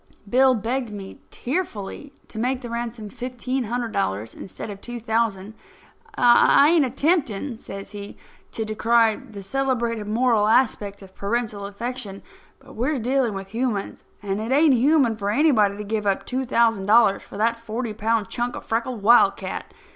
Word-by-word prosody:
Bill 255 +4 +4
begged 240 +3 -2
me 200 -2 -9
tearfully 275 - -4 0.2
to 220 - -7
make 255 +2 -1
the 240 -2 -7
ransom 235 -2 -4
fifteen 250 +1 -3
hundred 235 +1 -3
dollars 100 - -2
instead 200 - -8
of 200 0 -10
two 240 0 -6
thousand. 220 -3 -1 0.6
"I 245 +4 +6
ain't 325 -5 +4
attempting," 270 - 0
says 195 -3 -9
he, 205 -1 -8 0.4
"to 220 - -2
decry 225 +1 +2
the 220 -7 -11
celebrated 235 -2 -1
moral 225 -1 +2
aspect 210 -4 +1
of 190 -1 -15
parental 210 -1 -2
affection, 210 -1 -6 0.3
but - - -16
we're 265 +6 0
dealing 250 -2 0
with 195 0 -7
humans, 225 -2 -3 0.2
and 200 +1 -2
it 225 +3 -4
ain't 290 +1 +5
human 255 -2 +3
for 200 -1 -2
anybody 215 -6 +3
to 210 - -5
give 210 0 -2
up 195 - 0
two 260 0 -3
thousand 225 -5 +2
dollars 215 -2 +5
for - - -11
that 230 +2 +1
forty 230 0 -4
pound 220 -1 0
chunk 245 0 -3
of - - -8
freckled 230 -1 -2
wildcat. 235 +3 +3
230 Hz, 160 wpm, -23 LUFS, 205-250 Hz, 0.6 s, I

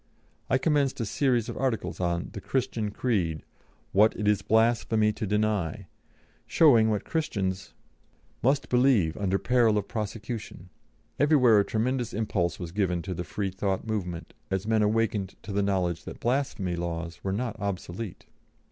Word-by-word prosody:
I 130 - +4
commenced 140 -1 +1
a 115 - -1
series 120 0 +1
of - - -5
articles 130 -4 -2
on 85 -1 -1
"The 100 - -6
Christian 120 -4 -1
Creed; 95 -8 -1 0.5
what 105 +3 +4
it 105 - -2
is 105 -2 +3
blasphemy 110 0 +2
to 110 0 -4
deny," 105 -4 0 0.6
showing 120 -9 +5
what 105 -2 -1
Christians 95 - -2 0.7
must 135 +4 +2
believe 125 -10 +3
under 95 -1 0
peril 115 -2 +3
of 105 - -2
prosecution. 105 -3 -5 0.5
Everywhere 130 -7 +5
a - - +4
tremendous 120 +3 -1
impulse 100 -5 -1
was 85 -2 -6
given 90 -3 0
to 95 - -4
the 90 - -4
Freethought 95 +1 -2
movement, 90 -6 -4 0.2
as 95 +1 -1
men 110 0 +2
awakened 105 -2 0
to 100 - -7
the 100 +1 +1
knowledge 90 -4 0
that - - -8
blasphemy 120 -8 -1
laws 85 -1 -5
were 95 - -1
not 115 +3 -2
obsolete. 95 0 -5
105 Hz, 150 wpm, -27 LUFS, 95-115 Hz, 0.7 s, showing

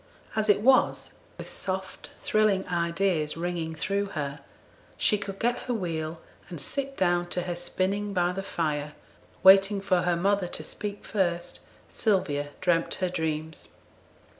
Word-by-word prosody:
As 215 -1 +1
it 205 0 +5
was, 260 +3 +3 0.2
with - - -8
soft 190 0 -4
thrilling 215 -3 +2
ideas 170 -2 0
ringing 170 -2 -3
through 200 +5 0
her, 140 -1 -3 0.6
she - - +3
could 195 -1 -5
get 240 +3 0
her 245 - +1
wheel, 165 -5 -3 0.3
and 170 -4 -5
sit 275 - -3
down 175 -1 +2
to 180 - 0
her 180 - -2
spinning 190 +4 -2
by 180 -2 +1
the 195 +2 -3
fire; 150 -5 -2 0.5
waiting 195 +1 +7
for 185 -2 +2
her 175 0 +2
mother 195 +1 +1
to - - -5
speak 205 -1 -5
first, 175 -3 -1 0.3
Sylvia 145 -9 0
dreamt 175 -2 +2
her 185 -1 -1
dreams. 160 -2 -3
180 Hz, 145 wpm, -27 LUFS, 170-200 Hz, 0.6 s, waiting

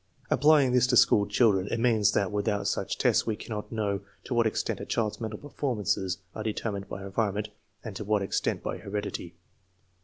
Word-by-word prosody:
Applying 145 -4 +5
this 125 0 +4
to 125 -1 +3
school 100 -2 +5
children, 105 -3 +3
it 115 - -1
means 115 -4 +3
that 100 -2 +1
without 105 -1 0
such - - -1
tests - - +2
we 110 - 0
cannot 105 -1 -6
know 105 -3 -1 0.2
to - - -4
what 115 -1 +3
extent 110 - -2
a - - -5
child's 110 0 -1
mental 110 -1 -4
performances 105 -10 -2 0.2
are 110 - -5
determined 105 -2 -3
by 95 - -6
environment 105 +1 -1 0.3
and 110 -4 -7
to 105 - -4
what 105 -1 +1
extent 95 - -1
by - - -3
heredity. 100 -4 -5
105 Hz, 185 wpm, -28 LUFS, 100-115 Hz, 0.3 s, Applying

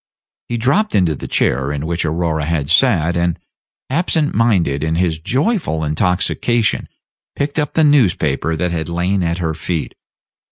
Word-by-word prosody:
He 120 - -1
dropped 160 - +1
into 90 -5 +3
the - - -7
chair 65 +3 0
in 75 +1 -3
which 85 +1 -1
Aurora 80 -1 -1
had 75 -2 -1
sat, 90 - +3
and, 85 0 0 0.5
absent 155 +1 0
minded 95 -11 +1
in 80 +1 0
his 85 -2 0
joyful 130 - 0
intoxication, 90 +8 0 0.5
picked 145 +2 -2
up 150 -2 -2
the 160 - +4
newspaper 85 - +2
that 90 +2 -1
had 80 -1 -3
lain 90 +3 0
at 85 0 -1
her 80 -3 -2
feet. 85 0 -4
85 Hz, 155 wpm, -18 LUFS, 80-120 Hz, 0.5 s, the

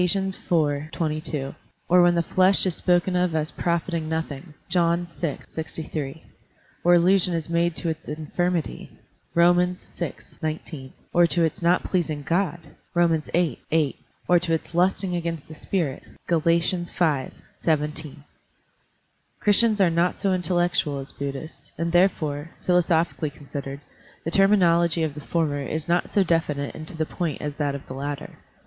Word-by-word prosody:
iv, 170 -5 0
22), 155 -4 -3 0.3
or 180 +1 +6
when 175 0 +5
the 170 - +2
flesh 185 +3 +4
is 185 - +1
spoken 180 +2 +2
of 180 -2 +1
as 155 +1 -1
profiting 170 -2 -1
nothing 160 -1 -4
(John 170 -1 +2
vi, 170 -3 -4
63), 160 -2 -5 0.6
or 175 0 +6
allusion 180 0 +4
is 165 0 -4
made 170 0 +1
to 170 - -1
its 160 0 -5
infirmity 160 +3 -2 0.5
(Rom. 175 +1 +6 0.2
vi, 175 -2 -6 0.3
19), 155 -3 -5 0.2
or 175 0 +5
to 170 0 +2
its 160 +1 -1
not 175 +2 +3
pleasing 160 -5 -1
God 170 -2 -1 0.2
(Rom. 170 -2 +3
viii, 170 -7 +1
8), 155 -3 +2 0.3
or 175 0 +5
to 170 -1 0
its 160 - -6
lusting 180 +1 +2
against 165 -3 -3
the 155 - -10
spirit 155 -3 -2 0.3
(Gal. 170 -2 +3
V, 165 +2 +3 0.9
17). 150 -2 -2 1.2
Christians 215 +1 +4
are 185 -3 +4
not 170 +2 +2
so 200 - -1
intel 180 0 0
lectual 145 -5 -1
as 135 - -8
Buddhists, 140 0 -7
and 165 +1 -1
therefore, 165 -4 +1 0.2
philosophically 170 -3 +2
considered, 140 -1 -7 0.4
the 165 - -1
terminology 170 -4 +4
of 155 -3 -1
the 150 - -8
former 150 -3 -1
is 150 +2 -3
not 175 +1 +1
so 200 - +3
definite 155 -5 0
and 155 - -8
to 160 - -7
the 160 - 0
point 165 -2 -3
as 150 - -3
is 145 - -19
that 145 -2 0
of 140 - -8
the - - -8
latter. 140 +1 -5
165 Hz, 155 wpm, -24 LUFS, 150-175 Hz, 1.2 s, or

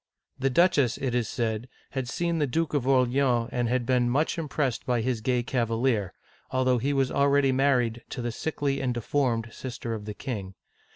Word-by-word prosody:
The 135 +1 +2
duchess, 140 -4 +3
it 130 -3 -2
is 120 -3 0
said, 115 +1 -2 0.2
had 130 -2 -3
seen 170 +3 -1
the 145 - +2
Duke 160 +5 -1
of 135 -4 0
Orleans, 125 -2 +2
and 120 -2 0
had 125 -1 0
been 125 -1 +2
much 145 +6 +1
im 155 -3 -4
pressed 135 -5 -1
by 125 -1 0
this 120 -1 -1
gay 125 +1 +1
cav 120 -1 0
alier, 115 -4 +1 0.4
although 130 -1 +2
he 135 +5 0
was 135 -2 +1
already 140 -1 +3
married 125 -3 +2
to 125 - -5
the 120 - -1
sickly 140 +1 -2
and 125 -2 -1
deformed 120 -1 0
sister 120 -2 -5
of 105 -2 -5
the 105 -1 -6
king. 100 -8 -5
125 Hz, 195 wpm, -27 LUFS, 120-135 Hz, 0.4 s, duchess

